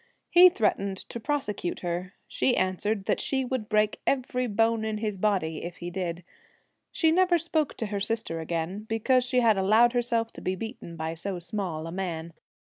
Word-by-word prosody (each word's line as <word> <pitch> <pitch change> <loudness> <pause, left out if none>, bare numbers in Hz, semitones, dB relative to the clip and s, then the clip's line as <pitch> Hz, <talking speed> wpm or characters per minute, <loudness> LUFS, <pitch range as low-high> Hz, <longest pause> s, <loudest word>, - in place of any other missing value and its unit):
He 360 +1 +9
threatened 200 - 0
to 235 - -5
prosecute 225 - -2
her; 180 +2 -3
she 255 - +1
answered 190 +2 0
that - - +1
she 265 -1 0
would 245 -4 -3
break 210 0 +2
every 255 -1 0
bone 225 +1 +2
in 220 -1 -2
his 210 -1 -2
body 185 -6 0
if 175 0 -6
he 175 0 -6
did. 175 -1 -3 0.7
She 320 -2 +3
never 360 +1 +4
spoke 320 -2 -1
to 225 - -2
her 205 -1 -3
sister 205 -5 -2
again, 170 +5 -3
because 250 +3 +2
she 250 0 +2
had 220 -4 +4
allowed 220 +5 +5
herself 235 -2 0
to - - -10
be 185 - -1
beaten 220 -4 -7
by 160 0 -3
so 180 +3 -4
small 170 -2 -4
a 165 - -6
man. 170 -3 -4
210 Hz, 185 wpm, -27 LUFS, 180-240 Hz, 0.7 s, He